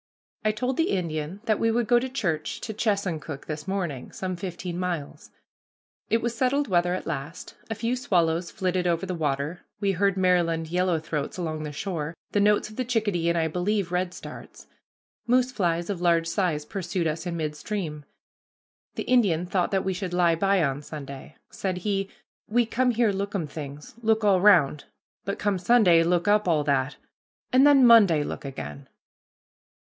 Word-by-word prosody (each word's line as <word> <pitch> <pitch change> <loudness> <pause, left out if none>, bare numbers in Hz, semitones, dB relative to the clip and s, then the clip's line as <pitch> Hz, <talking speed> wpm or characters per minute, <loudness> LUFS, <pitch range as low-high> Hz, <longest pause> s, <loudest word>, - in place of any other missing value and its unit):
I 215 - +3
told 250 +5 -2
the 325 - +2
Indian 170 0 -2
that 215 -3 +1
we 225 - +2
would 235 +1 +1
go 240 +2 +4
to 260 +2 -4
church 170 - -2
to 220 - -5
Chesuncook 185 - -2
this 150 -1 -6
morning, 175 -10 -3
some 185 -1 -4
fifteen 180 -1 -5
miles. 175 -6 -4 0.8
It 225 0 +1
was 235 0 -1
settled 270 +4 +1
weather 175 -1 +2
at - - -5
last. 165 +3 -5 0.2
A 225 - -2
few 230 +3 -1
swallows 170 -7 +1
flitted 185 -1 -1
over 170 +1 0
the 185 - -3
water, 150 +1 -2 0.2
we 200 -1 +1
heard 195 +1 +1
Maryland 170 -3 +2
yellow 180 0 +1
throats 155 -1 -4
along 160 -3 -3
the 150 -1 -5
shore, 160 0 -4 0.2
the 205 - +1
notes 205 +1 +3
of 215 - -13
the 255 - 0
chickadee, 210 -8 0
and, 170 - +1
I 160 -1 +2
believe, 180 +3 -1
redstarts. 180 0 -5 0.6
Moose 250 +1 +3
flies 175 -6 0
of 195 -4 -3
large 170 -1 +3
size 170 -4 -1
pursued 180 -1 -3
us 160 +3 -2
in 170 -1 -3
midstream. 155 0 -4 0.9
The - - -3
Indian 200 -10 +2
thought 180 -1 0
that 195 -1 0
we 190 - 0
should 180 -1 -4
lie 175 -2 +4
by 195 +1 +2
on 140 -1 -1
Sunday. 140 -1 -9 0.2
Said 185 -2 -3
he, 195 +1 -1 0.4
"We 240 +2 +2
come 250 +3 +1
here 235 -2 +2
lookum 200 -3 -2
things, 145 -1 -8
look 220 -1 +2
all 195 -3 +4
round, 165 -8 +5 0.4
but 200 - -2
come 205 -2 0
Sunday 180 -4 +5
look 175 +2 +1
up 210 -1 +3
all 155 -4 +2
that, 140 -1 0 0.6
and 265 +3 +7
then 275 -3 +7
Monday 200 -10 +6
look - - -6
again." 75 - -7
180 Hz, 175 wpm, -26 LUFS, 160-210 Hz, 0.9 s, and